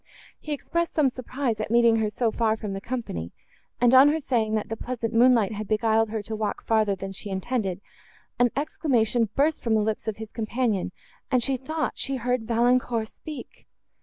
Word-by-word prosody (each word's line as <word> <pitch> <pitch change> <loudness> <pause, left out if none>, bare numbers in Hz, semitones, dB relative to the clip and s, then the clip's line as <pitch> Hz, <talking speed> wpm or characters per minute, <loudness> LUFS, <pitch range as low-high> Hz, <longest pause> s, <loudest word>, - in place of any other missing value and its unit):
He 305 - -8
expressed 340 +4 -2
some 285 -4 +3
surprise 255 -2 -3
at 215 - -3
meeting 235 0 +5
her 220 -1 +1
so 225 +2 0
far 225 -1 +1
from 210 -3 -5
the 195 - -5
company; 215 - -4 0.5
and, 245 0 +4
on 265 +2 +8
her 315 +2 +1
saying, 230 -6 0
that 215 - -1
the 225 - -3
pleasant 235 -1 -4
moonlight 235 -3 +5
had 215 -1 -5
beguiled 220 +1 +2
her 220 -1 -3
to 220 +2 -5
walk 215 -1 -3
farther 215 -3 +2
than 195 0 -6
she 200 +2 -6
intended, 195 -1 -2 0.6
an 245 0 +5
exclamation 245 -6 +1
burst 300 +3 +2
from 230 -2 +1
the - - +3
lips 215 0 -2
of 220 - -2
his 220 -1 -8
companion, 225 -4 -1 0.4
and 250 -3 +2
she 270 - 0
thought 310 +5 -3
she 275 - -1
heard 245 -2 -1
Valancourt 235 -1 +2
speak! 305 -3 -10
230 Hz, 190 wpm, -26 LUFS, 215-255 Hz, 0.6 s, on